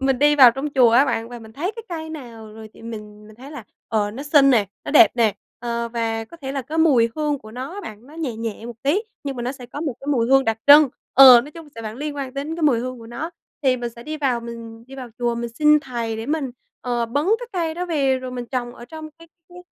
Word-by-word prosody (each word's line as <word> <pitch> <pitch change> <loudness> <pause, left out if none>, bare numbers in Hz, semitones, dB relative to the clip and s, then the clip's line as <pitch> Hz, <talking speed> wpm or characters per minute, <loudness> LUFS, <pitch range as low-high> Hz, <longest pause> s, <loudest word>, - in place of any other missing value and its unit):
mình 270 -1 +1
đi 295 +1 +4
vào 260 -4 +9
trong 270 +5 -4
chùa 245 -3 +6
á 245 +4 +5
bạn, 230 -4 -2
và 245 - -8
mình 220 -1 -13
thấy 345 - -3
cái 460 - -7
cây 320 -2 -6
nào 230 -8 -10
rồi 220 0 -10
thì - - -16
mình 210 -2 -9
mình 215 0 -16
thấy 265 +4 -12
là, 290 -7 -9 0.2
ờ, 210 -2 0
nó 245 +6 -7
xinh 290 -2 +5
nè, 220 -6 +3 0.2
nó - - -4
đẹp 330 +2 +7
nè, 220 -4 +2 0.2
ờ, 235 0 -3
và 225 -1 -2
có 335 - -14
thể 270 -4 -6
là 275 -2 -3
cái 310 +6 -5
mùi 260 -8 +4
hương 300 -2 -1
của 215 -3 -13
nó 260 +5 -6
á 410 - -6
bạn, 220 - -10
nó 295 - -15
nhẹ 295 -9 -4
nhẹ 225 0 -5
một 235 -1 -10
tí 325 +10 +1 0.2
nhưng 275 -2 -4
mà 240 - -4
nó 250 +2 -2
sẽ 255 -3 -11
có 285 +4 -8
một 290 -6 -2
cái 275 - -11
mùi 230 -3 +1
hương 270 +2 +4
đặc 225 -2 0
trưng, 290 0 +8 0.3
ờ, 255 -2 +10
nói 285 - -10
chung 325 -1 -12
sẽ 230 - -8
vẫn 215 +1 -6
liên 295 +1 -5
quan 270 -2 -5
đến 300 +4 -4
cái 335 - -5
mùi 275 -6 +4
hương 255 0 -5
của 230 - -12
nó. 275 +9 -6 0.3
Thì 260 -2 +3
mình 240 -1 -4
sẽ 235 - -10
đi 310 +3 -5
vào 260 -5 0
mình 230 -1 -9
đi 265 - -12
vào 255 -2 -8
chùa, 240 -1 0
mình 235 0 -4
xin 300 0 +5
Thầy 235 -5 -4
để 225 +1 -6
mình, 290 -2 -2 0.3
ờ, 240 -2 -1
bứng 295 - +1
cái 485 - -8
cây 330 -3 -2
đó 360 +1 -4
về 275 -6 +1
rồi 255 0 -7
mình 245 -1 -6
trồng 245 -1 -4
ở 240 - -11
trong 310 +4 -9
cái 330 - -16 0.2
cái 355 0 -13
255 Hz, 285 wpm, -21 LUFS, 235-295 Hz, 0.3 s, ờ